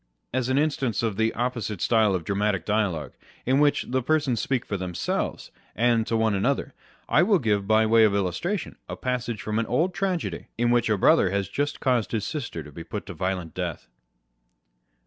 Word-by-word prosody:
As 130 -1 0
an 130 - +2
instance 135 -8 0
of 110 -3 0
the 110 +2 +1
opposite 120 -4 -2
style 110 -1 +3
of 90 - -3
dramatic 100 -1 0
dialogue, 95 - 0 0.3
in 130 +3 +3
which 145 -1 +3
the 130 +1 0
persons 140 -3 +1
speak 130 0 -1
for 100 - -3
themselves, 90 -2 -3 0.2
and 115 -1 +2
to 115 - +1
one 110 -1 +2
another, 100 0 0 0.3
I 155 - +4
will 200 +2 +4
give, 105 - 0
by 110 +1 +4
way 110 +1 +5
of 105 -2 +4
illustration, 100 - -2
a - - -4
passage 125 -5 -3
from 110 +1 -1
an 115 - -1
old 165 +9 +1
tragedy, 180 -1 -2
in 120 +1 +2
which 120 -1 +2
a 105 - +2
brother 95 - +4
has 100 0 -1
just 145 +6 -2
caused 125 -5 +1
his 105 -3 -1
sister 120 - -4
to 75 - -12
be 85 +3 -8
put 100 +5 -6
to - - -7
a - - -9
violent 90 -1 -3
death. 85 -9 -5
110 Hz, 200 wpm, -25 LUFS, 100-130 Hz, 0.3 s, way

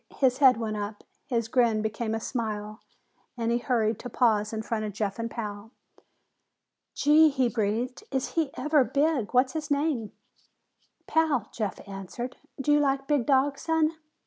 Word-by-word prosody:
His 260 -1 +2
head 265 -4 +7
went 220 -2 -3
up, 205 0 -5 0.2
his 230 -5 0
grin 230 -3 +2
became 220 +1 -2
a - - -2
smile, 215 -3 -4 0.6
and 230 0 0
he 235 - +2
hurried 230 -4 0
to 245 - -7
pause 215 -3 +2
in 220 -1 -4
front 220 -1 -2
of 210 -1 -4
Jeff 205 0 -3
and 230 0 -2
Pal. 210 -2 -6 1.3
"Gee!" 305 +2 +6
he 265 -3 +1
breathed. 230 +2 -2
"Is 265 -1 -1
he 320 -4 0
ever 300 -2 +3
big! 280 -4 0
What's 255 +1 +4
his 310 -1 -4
name?" 285 -7 0 0.9
"Pal," 305 -9 +1
Jeff 210 -3 -4
answered. 200 +6 -6 0.2
"Do 270 +2 +1
you 295 - +5
like 275 -1 +1
big 285 -4 +1
dogs, 275 0 +2
son?" 320 -1 +2
240 Hz, 165 wpm, -27 LUFS, 220-280 Hz, 1.3 s, head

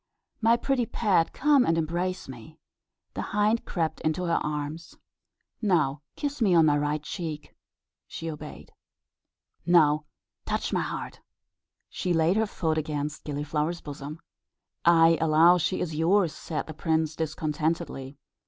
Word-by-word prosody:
My 230 +1 +4
pretty 250 -1 0
pet, 195 -7 +1
come 290 -2 +4
and 165 -5 +1
embrace 175 +3 -2
me." 130 +5 -11 0.6
The - - -3
hind 210 +3 +1
crept 165 -4 -2
into 155 +3 -1
her 170 -1 +1
arms. 150 +2 -5 0.6
"Now 155 - +1
kiss 285 -2 -4
me 195 -5 +4
on 165 -1 +6
my 150 -1 +4
right 150 +1 -1
cheek." 155 -2 -6 0.5
She 165 - -7
obeyed. 155 -2 -8 0.9
"Now 155 -4 +4 0.4
touch - - -2
my - - +2
heart." - - -5 0.7
She 180 - -2
laid 165 +2 +3
her 220 0 +2
foot 160 -5 -1
against 150 0 -4
Gilliflower's 150 +3 -2
bosom. 145 +1 -8 0.6
"I 165 -1 +5
allow 165 +3 +5
she 185 - 0
is 165 -3 -3
yours," 170 +2 +2
said 155 - -4
the 160 - -8
prince, 160 0 0
discontentedly. 155 -3 -3
160 Hz, 135 wpm, -27 LUFS, 150-180 Hz, 0.9 s, on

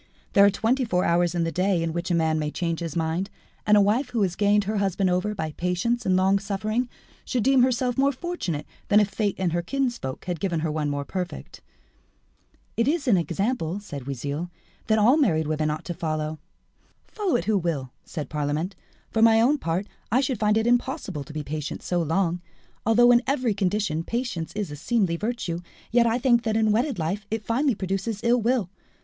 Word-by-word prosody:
There 200 - +7
are 200 - +7
twenty 230 +6 +1
four 180 -6 +1
hours 170 0 +2
in 170 - +1
the 165 - -1
day 185 -1 +1
in 165 -1 -2
which 170 +2 -3
a 175 - +2
man 160 -1 +1
may 150 -1 -1
change 165 0 -2
his 165 -3 -5
mind, 165 +4 -1 0.4
and 210 0 +6
a - - +6
wife 230 +7 +2
who 235 -4 0
has 180 -2 -1
gained 205 +1 +3
her 210 +2 -2
husband 195 -1 +1
over 195 +4 0
by 160 -5 -3
patience 180 +9 -1
and 185 - +3
longsuffering 200 +5 +1 0.3
should 245 -4 -1
deem 265 0 +4
herself 250 0 +1
more 275 +1 +4
fortunate 260 - -4 0.2
than 205 - +5
if 210 -1 +2
fate 200 0 -1
and 180 -3 0
her 175 - +1
kinsfolk 240 - -3
had 175 -3 -3
given 170 -2 -1
her 160 -1 -1
one 150 -1 -1
more 145 0 -2
perfect." 180 +1 -6 1.1
"It 230 +2 +1
is 295 -1 0
an 230 - +5
example," 190 - -1
said 145 -10 -8
Oisille, 140 +5 -3 0.4
"that 220 - +3
all 235 +7 +5
married 160 - +2
women 155 0 0
ought 150 +1 -4
to 175 - -3
follow." 155 -1 -3 0.7
"Follow 410 -5 -1
it 170 - 0
who 210 -1 +2
will," 150 -7 -2
said 150 - -6
Parlamente; 150 +5 -2 0.4
"for 225 - +1
my 225 0 +6
own 275 +6 +3
part, 170 +1 -1 0.3
I 245 - +4
should 260 -4 -1
find 210 0 +3
it 220 - +1
impossible 240 - 0
to - - -11
be 150 0 -4
patient 150 +1 -5
so 175 -1 0
long. 170 +2 0 0.5
Although 240 +2 +6
in 240 0 +6
every 255 -5 +1
condition 190 -4 0
patience 230 -7 -3
is 205 -7 -3
a - - -5
seemly 190 - 0
virtue, 210 -4 -3 0.3
yet 235 0 +4
I 230 +1 +2
think 240 -2 +3
that 220 -2 0
in 220 -1 +3
wedded 245 +4 +1
life 185 +6 -3
it 220 0 -3
finally 255 +2 +1
produces 195 +3 -3
ill 240 +1 +3
will. 225 -5 +1
195 Hz, 205 wpm, -25 LUFS, 165-230 Hz, 1.1 s, There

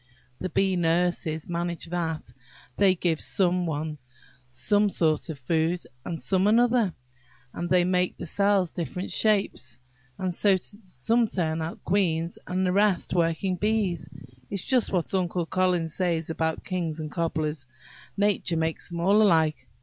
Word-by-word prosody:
The 185 - -3
bee 190 +3 +1
nurses 170 -2 0
manage 170 0 -3
that; 165 -6 -3 0.4
they 195 -2 +4
give 170 -3 0
some 180 -2 +1
one 155 -1 -3 0.5
sort 190 - +2
of 155 - -4
food, 160 +5 0 0.2
and 165 -2 -4
some 190 0 +2
another, 235 -3 +3 0.6
and 175 0 -4
they 180 -1 +4
make 180 0 +1
the - - -6
cells 200 0 +2
different 180 +2 -4
shapes, 195 - 0 0.4
and 185 -1 -2
so 195 +1 +3
some 205 - -1
turn 165 -5 -1
out 160 +1 -6
queens, 170 -3 0
and 185 +1 0
the 180 - +2
rest 200 -2 +2
working 175 +2 +1
bees. 205 -5 0 0.4
It's 200 -2 -2
just 255 -3 +2
what 180 -1 -1
Uncle 180 -2 0
Collins 180 -3 0
says 170 -3 -1
about 160 0 -2
kings 170 -4 -3
and 155 -1 -5
cobblers–nature 160 +4 -2
makes 160 +1 -2
them 170 -1 -5
all 200 +5 +4
alike. 160 -6 +3
175 Hz, 140 wpm, -26 LUFS, 160-195 Hz, 0.6 s, they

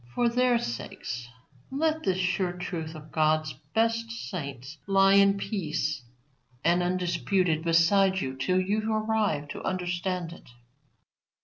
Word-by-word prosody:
For 240 -1 +3
their 250 0 +3
sakes 120 - -5 0.4
let 315 +3 0
this 185 -7 0
sure 185 -1 0
truth 170 -3 -5
of 155 0 -11
God's 155 -1 +2 0.2
best 230 0 +1
saints 145 - -6
lie 195 0 +5
in 200 0 +5
peace 155 - -2 0.6
and 175 +2 +3
undisputed 180 -1 0
beside 190 +3 +4
you 130 -5 -3
till 185 +8 +1
you 210 +4 0
arrive 215 -9 0
to - - -6
understand 180 -1 -2
it. - - -15
180 Hz, 125 wpm, -28 LUFS, 155-205 Hz, 0.6 s, lie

